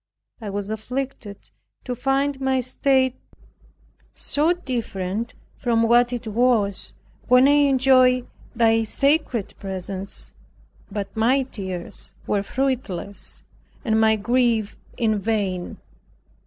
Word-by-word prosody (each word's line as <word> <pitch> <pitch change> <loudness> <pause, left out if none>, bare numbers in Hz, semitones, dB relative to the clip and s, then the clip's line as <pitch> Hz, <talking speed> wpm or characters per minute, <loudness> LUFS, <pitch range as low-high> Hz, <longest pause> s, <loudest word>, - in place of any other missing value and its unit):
I 215 - -5
was 200 +1 -4
afflicted 230 -2 -5 0.3
to 250 - -3
find 270 +2 0
my 265 -1 +2
state 260 +1 +1 1.0
so 305 +4 +1
different 230 - -3 0.2
from 230 -2 +1
what 240 +2 +4
it 245 -1 -4
was 220 -3 +1 0.3
when 250 +2 +6
I - - +5 0.2
enjoyed 255 -1 +4 0.3
Thy 225 -1 +4
sacred 275 -1 +1
presence; 190 0 -6 0.6
but 200 -1 -5
my 250 +5 +3
tears 190 -8 -7
were 205 - +1
fruitless 235 -5 -3 0.4
and 220 -1 +2
my 220 0 +5
grief 230 -1 +1 0.2
in 220 -3 +1
vain. 200 -4 -2
235 Hz, 105 wpm, -23 LUFS, 205-260 Hz, 1.0 s, when